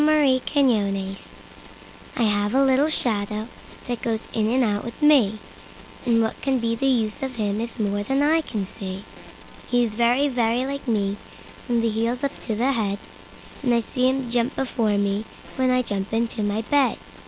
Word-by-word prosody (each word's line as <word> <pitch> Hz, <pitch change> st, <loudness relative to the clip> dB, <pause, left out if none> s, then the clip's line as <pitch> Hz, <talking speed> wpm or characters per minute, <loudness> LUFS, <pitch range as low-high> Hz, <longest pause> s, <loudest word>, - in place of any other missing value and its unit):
My 295 Hz, -4 st, +4 dB
Shadow 200 Hz, -9 st, +1 dB, 1.0 s
I -, -, +1 dB
HAVE 205 Hz, +1 st, +1 dB
a 275 Hz, -, +5 dB
little 270 Hz, +3 st, +3 dB
shadow 215 Hz, -6 st, -1 dB, 0.4 s
that 240 Hz, -2 st, -3 dB
goes 225 Hz, -1 st, -1 dB
in 220 Hz, -1 st, +1 dB
and 255 Hz, +2 st, +3 dB
out 205 Hz, -3 st, 0 dB
with 235 Hz, -, -8 dB
me, 275 Hz, -9 st, +5 dB, 0.7 s
And 230 Hz, -1 st, +4 dB
what 220 Hz, -, -3 dB
can 270 Hz, -2 st, +1 dB
be 230 Hz, -1 st, 0 dB
the 270 Hz, +4 st, 0 dB
use 230 Hz, -2 st, +1 dB
of 265 Hz, -2 st, -3 dB
him 210 Hz, -1 st, -1 dB
is 230 Hz, +1 st, -5 dB
more 205 Hz, -1 st, 0 dB
than 270 Hz, +7 st, +1 dB
I 320 Hz, +2 st, +4 dB
can 215 Hz, -10 st, -4 dB
see. 190 Hz, 0 st, -7 dB, 0.7 s
He 245 Hz, 0 st, +3 dB
is 230 Hz, -, -1 dB
very, 240 Hz, +6 st, +2 dB
very 245 Hz, -1 st, +1 dB
like 280 Hz, 0 st, -5 dB
me 205 Hz, -3 st, 0 dB, 0.5 s
from 240 Hz, -2 st, +2 dB
the 230 Hz, -, +1 dB
heels 230 Hz, +4 st, -1 dB
up 280 Hz, -, +1 dB, 0.2 s
to 220 Hz, -, 0 dB
the 250 Hz, +5 st, +2 dB
head; 210 Hz, -6 st, -1 dB, 0.6 s
And 245 Hz, -4 st, +2 dB
I 235 Hz, -, +3 dB
see 255 Hz, +3 st, +1 dB
him 260 Hz, -2 st, -2 dB
jump 245 Hz, +2 st, 0 dB
before 230 Hz, -5 st, 0 dB
me, 200 Hz, +1 st, 0 dB, 0.3 s
when 260 Hz, -1 st, +2 dB
I 255 Hz, 0 st, +3 dB
jump 200 Hz, -3 st, -3 dB
into 230 Hz, 0 st, -1 dB
my 205 Hz, +2 st, -1 dB
bed. 280 Hz, +2 st, +2 dB
235 Hz, 190 wpm, -23 LUFS, 210-260 Hz, 1.0 s, a